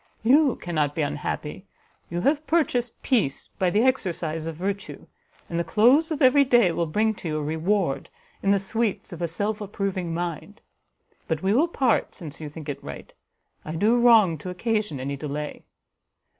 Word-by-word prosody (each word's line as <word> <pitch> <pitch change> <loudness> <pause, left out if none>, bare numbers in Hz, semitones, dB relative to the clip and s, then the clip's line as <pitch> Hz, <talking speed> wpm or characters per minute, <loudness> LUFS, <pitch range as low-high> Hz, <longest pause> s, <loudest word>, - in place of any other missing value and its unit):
You 275 +3 +5
cannot 155 -4 -2
be 160 - 0
unhappy, 150 +5 -4 0.4
you 175 +1 -2
have 295 - +1
purchased 250 -8 0
peace 210 - 0
by 185 - +3
the 210 +5 +2
exercise 170 -11 -1
of 165 - -4
virtue, 195 +4 -4 0.4
and 170 - -2
the - - +1
close 255 - +4
of 310 -3 -1
every 270 +2 +6
day 240 -8 +4
will 170 0 -1
bring 215 +7 +1
to 190 - -8
you 155 -1 -1
a 150 - -2
reward, 160 +1 -1 0.3
in 195 - 0
the 200 - +5
sweets 205 0 -2
of 175 - -8
a 170 - 0
self 205 +6 -2
approving 195 -3 -3
mind. 170 +4 -4 0.7
But 160 0 -2
we 195 +1 +2
will 295 +9 +4
part, 260 -9 +1
since 160 -2 -8
you 150 - -5
think 150 +1 -10
it 145 - -5
right; 70 0 -9 0.5
I 155 - -5
do 215 +8 +3
wrong 225 - +5
to 180 - -6
occasion 210 - -1
any 140 +2 -3
delay." 150 +1 -5
190 Hz, 180 wpm, -25 LUFS, 160-230 Hz, 0.7 s, every